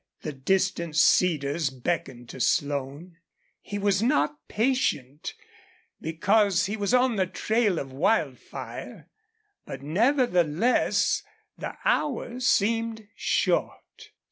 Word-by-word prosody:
The 155 - -5
distant 170 +3 0
cedars 155 -2 +3
beckoned 130 -2 -4
to - - -9
Slone. 145 +6 -1 0.4
He 205 - -5
was 200 -1 +1
not 150 - +2
patient, 205 - -1 0.7
because 195 +4 +2
he 205 +3 -2
was 205 -2 -1
on 250 -2 +3
the 190 -1 +1
trail 215 -1 0
of 135 -3 -5
Wildfire; 155 - -2 0.5
but, 135 0 -8
nevertheless, 215 - +2 0.3
the - - -7
hours 255 - 0
seemed 225 0 +1
short. - - -1
185 Hz, 100 wpm, -26 LUFS, 150-225 Hz, 0.7 s, cedars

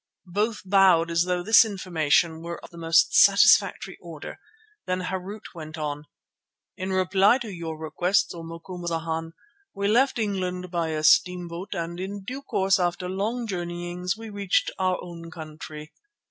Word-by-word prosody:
Both 210 +2 -1
bowed 185 -4 +4
as 170 +1 +2
though 180 -1 -1
this 220 +4 +7
information 170 -5 0
were 170 0 -6
of - - -12
the 170 - -13
most 165 0 +3
satisfactory - - +5
order. - - -9 0.5
Then 185 0 -1
Harût 190 +3 -6
went 160 -2 -8
on: 150 -1 -4 0.7
"In 190 +1 -4
reply 190 +4 +4
to 230 -6 -7
your 165 -2 -6
requests, 175 +5 0
O 170 - -8
Macumazana, 165 -1 -5 0.4
we 200 0 -1
left 250 +6 +3
England 185 -4 -2
by 170 -2 -1
a 155 -1 -3
steamboat 180 +2 +2
and 170 +1 -4
in 195 +1 -5
due 260 +7 -6
course 195 -8 +1
after 180 0 -1
long 215 +6 -2
journeyings 175 0 -4
we 225 -1 -9
reached 200 -2 0
our 185 -1 +1
own 170 -1 -9
country. 155 -1 -9
180 Hz, 150 wpm, -25 LUFS, 165-195 Hz, 0.7 s, this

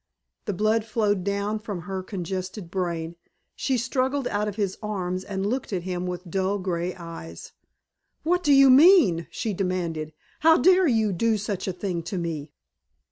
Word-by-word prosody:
The 205 - -2
blood 215 +3 +1
flowed 210 -4 0
down 200 +2 -1
from 205 -5 -5
her 190 +2 -4
congested 185 -1 -5
brain. 170 -3 -3 0.4
She 265 -2 0
struggled 260 +2 0
out 210 +1 -1
of 205 - -4
his 200 -3 -1
arms 185 -4 -3
and 195 -1 -3
looked 245 +4 -2
at 180 -3 -2
him 180 0 -3
with 180 0 -5
dull 190 +3 0
angry 180 -2 -2
eyes. 165 - -9 0.7
"What 355 +3 +2
do 300 -5 +2
you 275 -1 +7
mean?" 270 - +6
she 220 - -3
demanded. 175 -5 -2 0.3
"How 320 +1 +6
dared 370 -2 +5
you 220 -4 +2
do 220 +5 +1
such 200 -2 -4
a - - 0
thing 180 -1 -3
to 175 +4 -5
me?" 160 -4 -4
195 Hz, 170 wpm, -25 LUFS, 180-225 Hz, 0.7 s, you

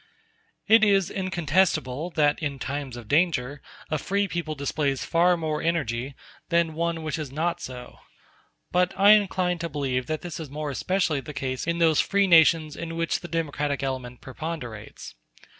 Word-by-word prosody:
It 225 0 +6
is 195 -4 +3
incontestable 175 -5 0
that 150 +1 +2
in 145 -3 -2
times 135 -1 -5
of 120 -3 -10
danger 145 -2 +1 0.3
a 155 - 0
free 200 +6 0
people 170 -3 -3
displays 140 -1 -1
far 175 +1 +3
more 155 -2 -2
energy 135 -6 -1 0.3
than 170 -2 +2
one 165 0 -2
which 155 0 -3
is 150 -4 -5
not 170 +4 -1
so. 125 -3 -9 0.7
But 180 0 +1
I 200 +2 +7
incline 185 -4 +3
to 170 0 -3
believe 135 -4 -2
that 155 -1 -2
this 175 -2 -6
is 155 -3 -7
more 150 +1 -4
especially 170 +1 0
the 150 +1 -9
case 130 0 -3
in 170 0 0
those 165 -3 +3
free 200 0 +2
nations 160 -3 +5
in 165 0 -6
which 165 0 0
the 175 - -8
democratic 150 -4 -2
element 130 -2 -4
preponderates. 130 -5 -7
155 Hz, 165 wpm, -25 LUFS, 140-170 Hz, 0.7 s, I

